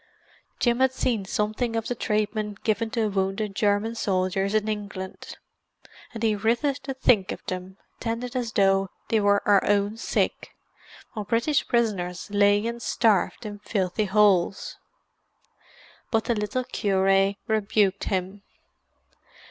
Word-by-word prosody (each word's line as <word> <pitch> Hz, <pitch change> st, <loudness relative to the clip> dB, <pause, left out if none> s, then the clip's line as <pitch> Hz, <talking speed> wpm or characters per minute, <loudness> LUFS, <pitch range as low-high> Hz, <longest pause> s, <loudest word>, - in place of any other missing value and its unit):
Jim 240 Hz, 0 st, +2 dB
had 265 Hz, 0 st, +4 dB
seen 235 Hz, -6 st, -1 dB
something 215 Hz, +4 st, -1 dB
of 225 Hz, -1 st, -2 dB
the -, -, -1 dB
treatment 210 Hz, -2 st, -2 dB
given 225 Hz, +1 st, 0 dB
to 220 Hz, -1 st, 0 dB
wounded 195 Hz, +1 st, -1 dB
German 205 Hz, +2 st, +1 dB
soldiers 195 Hz, -1 st, 0 dB
in 215 Hz, 0 st, +1 dB
England, 200 Hz, -3 st, -6 dB, 0.7 s
and 230 Hz, -1 st, -7 dB
he 220 Hz, -2 st, +3 dB
writhed 240 Hz, +7 st, 0 dB
to 270 Hz, -1 st, -4 dB
think 220 Hz, -7 st, +3 dB
of -, -, -8 dB
them, 185 Hz, +1 st, -6 dB, 0.2 s
tended 235 Hz, +2 st, -4 dB
as 240 Hz, -3 st, -2 dB
though 195 Hz, -1 st, +3 dB, 0.2 s
they 225 Hz, -, +3 dB
were 200 Hz, 0 st, +3 dB
our 200 Hz, -1 st, +5 dB
own 205 Hz, +1 st, +1 dB
sick, 225 Hz, -, -2 dB, 0.6 s
while 215 Hz, -, -4 dB
British 235 Hz, +8 st, +1 dB
prisoners 200 Hz, -6 st, -1 dB
lay 205 Hz, +1 st, +3 dB
and 235 Hz, 0 st, -4 dB
starved 220 Hz, -1 st, +1 dB
in 205 Hz, -1 st, -6 dB
filthy 200 Hz, 0 st, -1 dB
holes. 195 Hz, -2 st, +2 dB, 1.3 s
But 225 Hz, -1 st, +1 dB
the 235 Hz, -, 0 dB
little 210 Hz, +4 st, -2 dB
cure 195 Hz, -2 st, +2 dB
rebuked 205 Hz, -2 st, +1 dB
him. 190 Hz, +1 st, -2 dB
210 Hz, 135 wpm, -25 LUFS, 195-230 Hz, 1.3 s, our